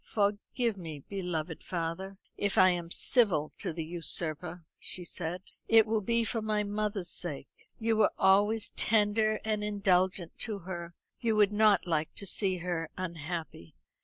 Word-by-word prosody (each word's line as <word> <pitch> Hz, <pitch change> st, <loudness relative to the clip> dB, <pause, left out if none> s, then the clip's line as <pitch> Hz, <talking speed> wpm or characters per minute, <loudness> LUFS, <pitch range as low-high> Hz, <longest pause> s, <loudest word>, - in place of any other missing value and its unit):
"Forgive 210 Hz, +1 st, -1 dB
me, 160 Hz, -4 st, -6 dB
beloved 175 Hz, -4 st, -4 dB
father, 180 Hz, +3 st, -4 dB, 0.2 s
if 200 Hz, -1 st, -1 dB
I 185 Hz, 0 st, +7 dB
am 175 Hz, -1 st, -3 dB
civil 185 Hz, -, +3 dB
to -, -, -2 dB
the 165 Hz, 0 st, -5 dB
usurper." 170 Hz, 0 st, -2 dB
she 180 Hz, -, 0 dB
said. 175 Hz, +1 st, -4 dB, 0.2 s
"It 225 Hz, -1 st, +6 dB
will 220 Hz, -1 st, 0 dB
be 230 Hz, +3 st, +1 dB
for 225 Hz, 0 st, -2 dB
my 215 Hz, -1 st, 0 dB
mother's 205 Hz, -3 st, -2 dB
sake. 145 Hz, -5 st, -4 dB, 0.3 s
You 225 Hz, -1 st, 0 dB
were 220 Hz, -, +4 dB
always 205 Hz, +3 st, +4 dB
tender 215 Hz, 0 st, +2 dB
and 215 Hz, -1 st, -1 dB
indulgent 190 Hz, -4 st, +1 dB
to 215 Hz, -3 st, -3 dB
her; 170 Hz, -2 st, -6 dB, 0.2 s
you 225 Hz, -2 st, +1 dB
would 210 Hz, -1 st, +4 dB
not 210 Hz, -4 st, +4 dB
like 160 Hz, -3 st, -1 dB
to 200 Hz, -, -6 dB
see 190 Hz, 0 st, +1 dB
her 165 Hz, -3 st, -2 dB
unhappy." 165 Hz, -, -6 dB
190 Hz, 155 wpm, -30 LUFS, 170-210 Hz, 0.3 s, I